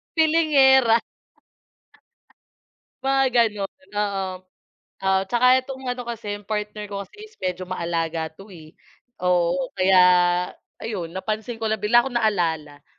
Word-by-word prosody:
Feelingera. 275 -7 +5 2.0
Mga 270 0 +2
gano'n, 210 -5 0
oo. 200 -2 -1 0.8
Oo, 190 0 +3
'tsaka 245 +1 +2 0.2
itong 265 -1 -8
ano 250 0 -3
kasi 220 -3 -5
'yong 205 - -15
partner 210 0 -3
ko 200 -1 -5
kasi - - -22
is 435 0 -16
medyo 185 0 -3
maalaga 165 -2 -2
'to, 195 +4 -15
eh. 155 -2 -14 0.5
Oo, 175 -1 +1
kaya 185 0 +4 0.8
ayun, 200 -7 -4
napansin 215 +5 -4
ko - - -3
lang, 220 -1 -1
bigla 240 +3 +4
kong 260 -3 -4
naalala. 160 -10 -1
210 Hz, 125 wpm, -23 LUFS, 185-240 Hz, 2.0 s, Feelingera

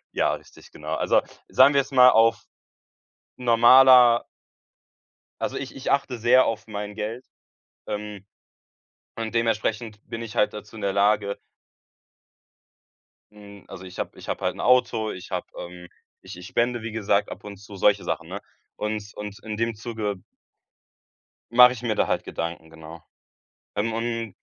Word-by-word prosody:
Ja, - - +1
richtig, - - -16
genau. 75 +1 -6
Also - - +2 0.3
sagen 130 +3 +5
wir 140 - +4
jetzt 135 - -11
mal 125 -1 +7
auf 115 +1 +3 0.9
normaler 125 0 +6 1.2
also, - - -2
ich 135 - -7
ich 135 - -3
achte 140 -3 0
sehr 120 +3 +4
auf 115 0 -3
mein 105 -1 -6
Geld, 110 +4 -5 0.6
ähm, 105 -2 -6 0.9
und 115 -1 -5
dementsprechend 115 -1 -1
bin 115 - -6
ich 115 0 -8
halt 105 - +2
dazu 105 +1 -10
in 110 - -9
der 100 -1 0
Lage 100 0 +1 1.9
hm, 100 -1 -15
also, 95 - -10
ich 90 0 -11
habe - - -5
ich - - -12
habe - - -4
halt - - -1
'n - - -13
Auto, 120 -3 +2
ich 90 +2 -10
habe, 90 -2 -3
ähm 90 0 -9 0.3
ich - - -11
ich 90 - -10
spende 120 0 0
wie 115 0 -6
gesagt 105 -2 0
ab - - -9
und 100 -1 -9
zu, 100 +1 -13
solche 100 +1 +2
Sachen, - - -4
ne? - - -5 0.4
Und 105 -1 -4
und 105 -1 -8
in 110 -1 -5
dem 115 0 -1
Zuge 105 -3 -5 1.3
mache 125 +1 +7
ich 120 - -9
mir 115 -3 -1
da - - +1
halt - - -1
Gedanken, 85 -1 -6
genau. 80 +1 -12 0.7
Ähm, 110 +2 -1
und 115 -2 -3
110 Hz, 160 wpm, -24 LUFS, 100-120 Hz, 1.9 s, mal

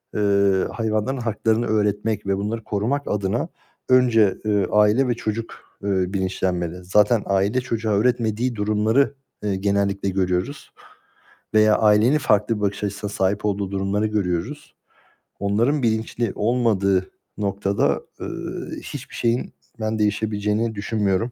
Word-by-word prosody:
eee, 100 -2 +2
hayvanların 110 +3 -1
haklarını 115 +1 0
öğretmek 105 0 0
ve 95 - +1
bunları 110 +3 -3
korumak 120 +8 -1
adına 105 - -1 0.4
önce, 115 -6 +4
eee, 105 -3 +2
aile 105 +5 +4
ve 120 - +2
çocuk, 115 0 -4 0.3
eee, 100 - -2 0.2
bilinçlenmeli. 90 -2 -2
Zaten 105 +4 +3
aile 100 +6 +1
çocuğa 115 -3 -2
öğretmediği 115 +2 +1
durumları, 110 +6 +2 0.3
eee, 100 -2 0
genellikle 100 0 0
görüyoruz 95 +8 -2 0.8
veya 110 0 +5
ailenin 110 +6 +4
farklı 105 -3 +2
bir - - -6
bakış 100 0 -1
açısına 100 0 -3
sahip 100 +1 0
olduğu 100 -1 -1
durumları 100 +2 0
görüyoruz. 90 -5 -3 0.7
Onların 115 +8 +1
bilinçli 110 -1 0
olmadığı 105 -5 +1 0.3
noktada, 100 0 0 0.2
eee, - - -4 0.6
hiçbir - - -8
şeyin 120 +1 0 0.3
ben 110 0 -1
değişebileceğini 105 +1 0
düşünmüyorum. 105 +2 0
105 Hz, 120 wpm, -22 LUFS, 100-115 Hz, 0.8 s, veya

